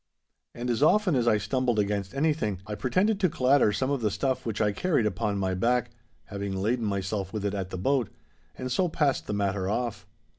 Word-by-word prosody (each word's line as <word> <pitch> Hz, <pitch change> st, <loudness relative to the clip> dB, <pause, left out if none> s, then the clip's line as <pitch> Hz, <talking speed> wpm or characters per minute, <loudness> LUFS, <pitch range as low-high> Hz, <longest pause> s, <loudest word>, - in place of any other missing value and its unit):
And 120 Hz, +1 st, -2 dB
as 120 Hz, -, -1 dB
often 185 Hz, +2 st, +4 dB
as 120 Hz, -2 st, +1 dB
I 110 Hz, -, +5 dB
stumbled 120 Hz, +3 st, 0 dB
against 100 Hz, +1 st, -1 dB
anything, 140 Hz, -, 0 dB
I 105 Hz, -, -5 dB
pretended 185 Hz, -, +1 dB
to 185 Hz, -3 st, +3 dB
clatter 135 Hz, -6 st, +3 dB
some 130 Hz, +6 st, -1 dB
of 140 Hz, -3 st, -1 dB
the 110 Hz, -, +2 dB
stuff 130 Hz, +4 st, -1 dB
which 110 Hz, -1 st, -2 dB
I 105 Hz, -1 st, +2 dB
carried 150 Hz, -, +1 dB
upon 100 Hz, 0 st, -1 dB
my 95 Hz, -1 st, 0 dB
back, 120 Hz, +5 st, +1 dB, 0.3 s
having 100 Hz, -1 st, -5 dB
laden 110 Hz, +5 st, 0 dB
myself 100 Hz, -1 st, -2 dB
with 105 Hz, -2 st, -3 dB
it 100 Hz, -, 0 dB
at 95 Hz, -2 st, -3 dB
the 95 Hz, -, -5 dB
boat. 125 Hz, +4 st, +1 dB, 0.5 s
And 130 Hz, 0 st, -4 dB
so 180 Hz, +7 st, +1 dB
passed 145 Hz, -4 st, 0 dB
the 105 Hz, -, -2 dB
matter 100 Hz, -2 st, -1 dB
off. 120 Hz, +1 st, -2 dB
110 Hz, 210 wpm, -27 LUFS, 100-130 Hz, 0.5 s, I